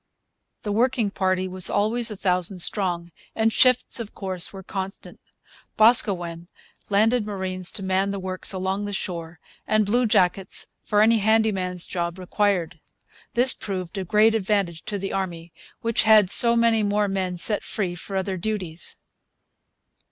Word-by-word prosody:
The 210 - -3
working 230 -1 +1
party 185 -1 0
was 185 0 +1
always 225 +3 0
a 210 - -6
thousand 180 -1 0
strong, 175 -4 -2 0.2
and 225 0 +1
shifts, 255 -1 +3
of 225 -3 -7
course, 185 -3 -3
were 195 -1 -10
constant. 195 +1 -7 0.6
Boscawen 180 -7 +2 0.4
landed 220 +4 +2
marines 190 -3 -4
to 195 - -5
man 190 +1 0
the 200 - -3
works 185 0 -2
along 190 +1 -2
the 205 - -5
shore, 170 -4 -5 0.3
and 215 -1 +2
bluejackets 200 -4 +2 0.2
for 210 0 +2
any 225 +1 +4
handy 220 +1 +3
man's 180 -2 -2
job 170 0 -3
required. 180 -3 -1 0.6
This 250 +2 +5
proved 185 -2 -6
of 190 - -5
great 215 +3 +4
advantage 195 -6 -1
to 205 - -3
the 195 0 -5
army, 175 -3 -4 0.3
which 230 -1 +1
had 215 -3 +5
so 235 -1 +6
many 230 -1 +3
more 205 0 +1
men 190 -2 -2
set 210 +4 +5
free 185 -5 -3
for 185 +3 -8
other 190 0 -2
duties. 180 -4 -3
195 Hz, 150 wpm, -23 LUFS, 185-215 Hz, 0.6 s, so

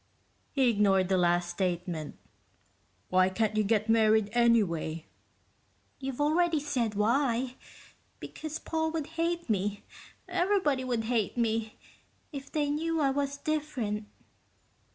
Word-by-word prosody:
He 270 -3 +2
ignored 195 -3 +3
the 190 - +3
last 175 0 +2
statement. 175 -4 -3 0.9
"Why 185 0 +4
can't 215 +2 0
you 215 - +3
get 215 +1 +1
married, 220 -2 +4
anyway?" 200 -9 +2 0.9
"You've 270 -1 -5
already 320 +2 +2
said 250 -7 -1
why. 245 +3 +1 0.6
Because 310 0 -6
Paul 320 -1 -1
would 320 -3 -2 0.2
hate 340 0 -1
me 205 -2 -1 0.4
everybody 355 -8 +1
would 240 -3 -1
hate 225 -1 -1
me 225 -2 -1 0.5
if 275 -2 -8
they 290 -2 0
knew 325 +2 -1
I 275 -2 +3
was 280 0 -1
different." 270 -9 -2
235 Hz, 120 wpm, -29 LUFS, 205-290 Hz, 0.9 s, Why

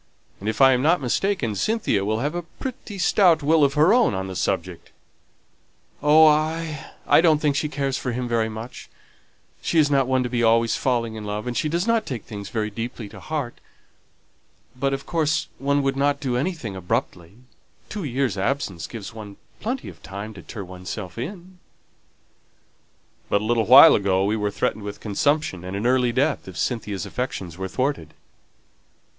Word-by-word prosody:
And 105 - -3
if 110 +3 -2
I 135 0 +8
am 125 - +1
not 165 +5 +3
mistaken, 135 - 0
Cynthia 110 - 0
will 110 +3 -1
have 145 +3 -1
a 175 - -2
pretty 215 +3 -8
stout 180 -4 +4
will 155 +1 +4
of 140 0 +2
her 155 +7 +5
own 235 - +3
on 95 0 -3
the 95 -1 -6
subject." 90 -2 -3 1.1
"Oh, 155 +2 +7
I 155 0 +1
don't 160 -3 +5
think 150 -2 +1
she 150 +1 -1
cares 140 -3 -2
for 125 - -3
him 125 +1 -3
very 115 -2 0
much; 110 +3 -8 0.7
she 170 - -1
is 145 -2 +4
not 135 -2 +3
one 130 -1 +2
to - - -2
be 120 -1 -1
always 115 0 +3
falling 120 -3 0
in 110 -1 -7
love, 105 +1 -4
and 125 -1 -3
she 150 - 0
does 170 +4 0
not 230 -1 +1
take 125 -5 -5
things 100 -2 -7
very 110 -2 -2
deeply 115 0 -6
to - - -12
heart. 145 -6 -4 1.2
But, 135 +2 0
of 135 0 -3
course, 160 -3 0
one 140 +1 +1
would 135 0 0
not 140 +1 +1
do 130 -4 -2
anything 130 - -3
abruptly; 95 -3 -3 0.5
two 210 -3 -5
years' 130 -7 -1
absence 95 - -2
gives 110 -2 -8
one 105 -3 -10 0.2
plenty 245 +4 -3
of - - -11
time 100 +3 -7
to 95 - -11
turn 100 -1 -8
oneself 90 +2 -7
in." 180 - -7 1.7
"But 100 - +2
a - - -4
little 115 -1 +1
while 135 +7 +10
ago 95 -1 +2
we 105 +2 +1
were 105 -1 -1
threatened 105 - -2
with 100 0 -6
consumption 115 - 0
and 95 +1 -5
an 105 - -3
early 125 -1 +3
death 135 +2 0
if 95 -3 -9
Cynthia's 105 -2 -2
affections 95 -9 -4
were 95 - -3
thwarted." 125 - -2
125 Hz, 185 wpm, -23 LUFS, 105-150 Hz, 1.7 s, while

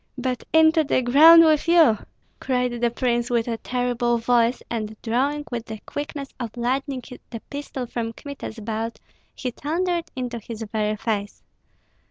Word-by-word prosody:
"But 250 -1 -2
into 320 0 +5
the 265 -3 +1
ground 320 +7 +8
with 310 0 +3
you!" 320 -11 +5 0.4
cried 250 -2 -1
the 240 - +3
prince, 240 0 -1
with 235 -1 +1
a 230 -1 -2
terrible 245 -1 0
voice; 235 +1 +2
and 220 -2 -4
drawing 275 +6 0
with 235 -2 -4
the 220 - -6
quickness 285 -1 -5
of 240 -1 -6
lightning 260 +2 -1 0.3
the 230 - -6
pistol 285 -3 -5
from 230 -1 -4
Kmita's 280 -3 -8
belt, 225 +1 -4 0.4
he 250 - -3
thundered 340 +5 -1
into 245 -2 -4
his 225 0 -7
very 215 -1 0
face. 205 -2 -3
245 Hz, 155 wpm, -23 LUFS, 230-280 Hz, 0.4 s, ground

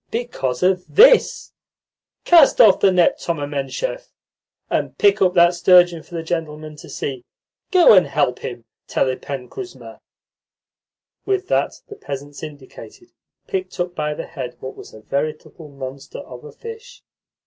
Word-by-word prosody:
"Because 180 - -3
of 185 0 +2
THIS. - - +4 0.7
Cast 330 -5 +6
off 205 -5 +7
the 195 - +4
net, 180 -2 +2
Thoma 160 -4 -3
Menshov, 145 - -4 0.6
and - - -2
pick 405 -1 +3
up 185 -1 +3
that 175 0 +5
sturgeon 175 -1 +4
for 175 - -13
the 165 - -4
gentleman 155 -2 -5
to - - -13
see. 130 -3 -5 0.5
Go 360 - +6
and 185 -6 +5
help 135 -2 0
him, 120 -2 -7 0.2
Telepen 130 0 -2
Kuzma." 380 -2 -10 1.2
With 390 -1 -2
that - - -1
the 420 - -10
peasants 140 - -8
indicated 150 - -12 0.3
picked 380 - -5
up 175 0 -2
by 150 -2 -3
the - - -6
head 130 -6 -8
what 130 - -8
was - - -12
a 110 - -14
veritable 150 +4 -5
monster 135 -1 -9
of 125 0 -11
a 150 - -10
fish. 460 +2 -11
165 Hz, 150 wpm, -20 LUFS, 140-230 Hz, 1.2 s, off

